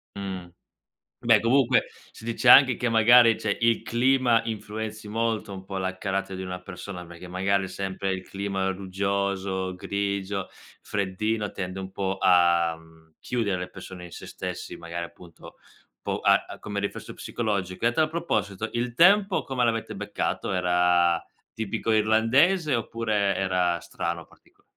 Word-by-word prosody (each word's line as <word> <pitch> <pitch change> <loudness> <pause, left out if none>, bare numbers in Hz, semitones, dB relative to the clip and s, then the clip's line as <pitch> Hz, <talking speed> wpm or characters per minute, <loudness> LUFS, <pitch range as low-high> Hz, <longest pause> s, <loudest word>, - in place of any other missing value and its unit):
Mh. 95 -3 -5 0.7
Beh, - - +4
comunque 125 +1 +3 0.3
si - - -14
dice 115 0 0
anche 130 -4 +8
che 125 - -1
magari, 115 0 +6
cioè, 100 -2 0
il 115 -1 +2
clima 120 -1 +3
influenzi 110 -1 -5
molto 110 -1 -1
un 95 -1 -8
po' 95 0 -5
la 95 0 -2
carattere 95 -1 -3
di 95 - -5
una 90 0 -5
persona, 90 0 -8
perché 85 +1 -11
magari 95 +2 0
sempre 95 0 -3
il 95 -1 -4
clima 95 0 -3
ruggioso, 95 0 -2
grigio, 100 0 -3 0.3
freddino 105 +2 -2
tende 90 0 -5
un 95 0 -7
po' 95 0 -2
a, 85 -2 +4
mhmm, 80 -1 -21
chiudere 110 -6 -1
le 90 - -5
persone 95 -1 -10
in 85 - -10
se - - -9
stessi, - - -6
magari 85 +1 -5
appunto 85 -1 -15 0.5
po' - - -2
a - - +4
a - - -9
come 105 -1 -4
riflesso 100 - -5
psicologico. 100 -3 -2
E - - +7
a - - -1
tal 155 +4 +2
proposito: 110 - -2
il 120 0 -2
tempo 195 - +5
come 130 -2 -1
l'avete 115 -1 -1
beccato? - - -3
Era 90 -2 +3 0.3
tipico 110 +1 -3
irlandese 130 - +3
oppure 110 -4 0
era 90 -2 0
strano, - - -4
particolare? - - -26
100 Hz, 155 wpm, -26 LUFS, 95-115 Hz, 0.7 s, anche